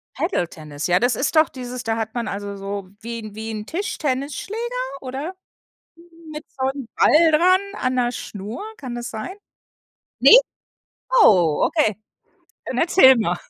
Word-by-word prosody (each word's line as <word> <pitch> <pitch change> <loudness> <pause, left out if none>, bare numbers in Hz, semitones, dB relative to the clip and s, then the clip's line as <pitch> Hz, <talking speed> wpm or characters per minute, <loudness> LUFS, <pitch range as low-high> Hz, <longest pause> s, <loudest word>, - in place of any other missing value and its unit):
Paddle-Tennis, 155 - -3
ja, 180 +1 +3
das 245 -2 +1
ist 280 - -1
doch 310 - +5
dieses 250 -1 -7
da 225 -2 -1
hat 220 0 -4
man 235 -1 -3
also 200 0 -5
so 195 -1 -6
wie 235 +1 -6
'n 215 -2 -10
wie 220 +1 -6
'n 215 -1 -6
Tischtennisschläger 310 - -3 0.4
oder? 275 +8 -5 1.0
Mit 300 0 -7
so 260 0 -1
'n 270 -3 -5
Ball 320 +1 +5
dran 365 +4 +4
an 255 0 -1
'ner 245 -1 +1
Schnur, 210 - -7
kann 255 -4 -7
das 240 0 -5
sein? 290 - -6 0.8
Ne? 480 - +9 0.8
Oh, 170 - +4
okay, 295 - +1 0.7
dann - - -4
erzähl 295 -6 +6
mal. 180 -6 0
245 Hz, 150 wpm, -21 LUFS, 210-300 Hz, 1.0 s, Ne